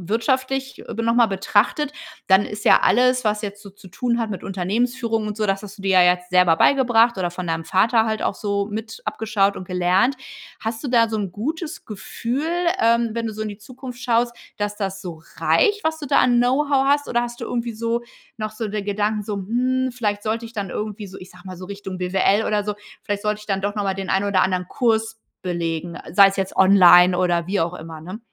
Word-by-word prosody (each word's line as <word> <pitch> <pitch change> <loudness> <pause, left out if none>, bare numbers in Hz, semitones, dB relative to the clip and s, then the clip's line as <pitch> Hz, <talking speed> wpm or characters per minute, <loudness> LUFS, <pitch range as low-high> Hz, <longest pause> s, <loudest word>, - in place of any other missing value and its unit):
wirtschaftlich 265 +2 -1
b 230 - -2
nochmal 230 0 +3
betrachtet? 210 +8 +1 0.4
Dann 190 +1 +5
ist 210 0 -7
ja - - +7
alles, 250 +5 +3
was 210 0 +1
jetzt 205 -1 -6
so 205 - -11
zu 195 0 -16
tun 240 +5 -1
hat 225 -2 -2
mit 195 -4 -6
Unternehmensführung 225 +4 -1
und 210 - -4
so 215 - 0
das 195 -1 0
hast 200 0 -10
du - - -11
dir 195 0 0
ja - - +7
jetzt 180 0 +2
selber 180 -2 +4
beigebracht 240 0 +4
oder 175 -2 -1
von 180 0 -6
deinem 165 0 -2
Vater 220 +5 +3
halt 220 -1 -2
auch - - 0
so 200 -1 -2
mit 220 +1 -6
abgeschaut 205 -2 0
und 185 - -8
gelernt. 185 +8 +2 0.4
Hast 225 0 -4
du - - -3
da 230 -2 +3
so 220 - -2
'n 200 -4 -3
gutes 305 - -5
Gefühl, 235 +7 -4 0.3
ähm, 235 0 +3
wenn 230 0 -3
du 220 - -5
so 215 - -6
in 215 - -3
die 205 - -8
Zukunft 250 +3 -10
schaust, 240 -1 +1 0.2
dass 205 0 -3
das 195 -2 -4
so 170 -4 -8 0.2
reicht, 415 -3 +2
was 320 0 -1
du 295 - -6
da - - +3
an 245 -1 +3
Know-how 270 +2 +2
hast, 285 +1 +2
oder 240 - +1
hast 240 0 -6
du - - -3
irgendwie 235 -1 -3
so 230 +2 -2 0.4
noch 215 -1 -4
so 215 +1 -4
den 210 -1 -4
Gedanken 210 +1 -1
so: 205 0 -4
„Hm, 255 +6 0
vielleicht 210 -4 -2
sollte 225 +1 -2
ich 230 - -11
dann 200 -4 -4
irgendwie 210 +1 -5
so, 190 +1 -11
ich 185 - -12
sage 180 -1 -17
mal, 185 -1 -8
so 185 - -8
Richtung 195 -1 -7
BWL 190 +3 +1
oder 210 -1 0
so 210 0 -2 0.3
vielleicht 205 -1 -3
sollte 210 0 -1
ich 210 - -13
dann 195 -2 -1
doch 205 +1 -2
nochmal 200 -2 -1
den 195 -1 -5
einen 195 +1 +1
oder 195 -2 +2
anderen 185 -1 0
Kurs 225 -1 0 0.2
belegen.” 170 -1 -3 0.2
Sei 195 +1 +8
es 195 - -3
jetzt 190 -1 -2
online 180 -2 +7
oder 175 -2 +1
wie 195 +2 0
auch 165 +1 -1
immer, 160 -2 -9
ne? 185 +7 -8
210 Hz, 230 wpm, -22 LUFS, 190-235 Hz, 0.4 s, Sei